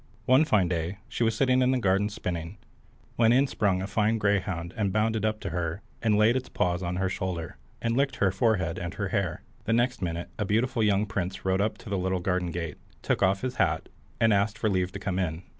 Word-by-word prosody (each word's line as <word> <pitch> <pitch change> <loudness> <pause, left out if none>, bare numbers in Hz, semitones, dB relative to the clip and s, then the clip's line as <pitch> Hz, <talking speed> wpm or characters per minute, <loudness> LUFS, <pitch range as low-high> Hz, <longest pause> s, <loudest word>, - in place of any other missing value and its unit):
One 130 +5 +5
fine 105 - +3
day 85 +2 -2
she 120 +1 -2
was 115 -1 +2
sitting 130 +1 +3
in 125 - +3
the 130 - +3
garden 100 -1 +2
spinning, 90 -3 -5 0.6
when 115 -1 +5
in 130 +3 +5
sprung 100 -8 0
a - - -2
fine 105 +3 +1
greyhound 95 -4 0
and 100 -3 0
bounded 110 +1 +1
up 110 0 0
to 95 - -4
her, 85 +2 -3 0.2
and 110 -3 +3
laid 105 +2 +5
his 130 -1 -3
paws 90 0 0
on 90 0 -2
her 95 +1 0
shoulder, 90 -3 -4 0.3
and 115 0 +1
licked 140 +2 +1
her 95 -2 +2
forehead 95 -7 +1
and 85 -1 -5
her - - -2
hair. - - -1 0.2
The 115 - +1
next 120 0 +1
minute 85 -1 -3
a - - +1
beautiful 115 +4 +1
young 105 -1 +3
prince 95 -1 -4
rode 95 +1 +2
up 105 +1 0
to - - -11
the 100 - 0
little 95 0 0
garden 90 0 -1
gate, 85 -1 -5 0.2
took - - 0
off 95 +1 +3
his 130 0 -3
hat, 80 -3 +1 0.3
and 115 -1 +4
asked 100 +1 +1
for 110 - 0
leave 95 -1 0
to - - -4
come 95 -2 -2
in. 85 -1 -2
100 Hz, 230 wpm, -27 LUFS, 90-110 Hz, 0.6 s, One